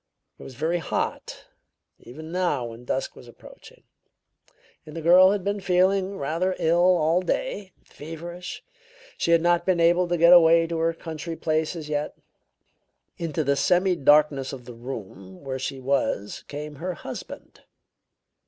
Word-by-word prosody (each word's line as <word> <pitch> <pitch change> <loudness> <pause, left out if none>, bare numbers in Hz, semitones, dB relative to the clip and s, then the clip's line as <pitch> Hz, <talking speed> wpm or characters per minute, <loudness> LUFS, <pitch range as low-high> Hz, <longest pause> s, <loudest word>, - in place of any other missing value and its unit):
"It - - -11
was 130 - -11
very 160 +6 -1
hot; - - -4 0.5
even 155 +6 -11
now 175 -8 -1
when 115 +1 -10
dusk 135 - -3
was 125 - -14
approaching. 120 - -16 1.0
The 155 +1 -8
girl 180 +3 +6
had 200 -1 -1
been 200 +1 -2
feeling 190 +1 +1
rather 170 +6 -1
ill 175 +2 +3
all 165 +3 +2
day; 190 +1 -3
feverish. 170 +3 -9 0.6
She - - -1
had 170 -1 +4
not 175 0 +2
been 180 -1 +1
able 175 +2 +3
to 175 0 0
get 170 +2 +7
away 165 -1 +6
to 165 0 -3
her 165 +1 +1
country 165 0 -7
place 155 +1 -1
as 160 -3 -7
yet. 150 0 -3 1.0
Into 160 -2 -2
the 140 0 +1
semidarkness 150 -6 +3
of 125 -3 -9
the 125 - -9
room 100 -6 -9
where 130 -1 -4
she 135 +1 -4
was 130 -6 -2
came 150 0 -7
her 180 +3 -4
husband. - - -10
165 Hz, 150 wpm, -24 LUFS, 140-175 Hz, 1.0 s, get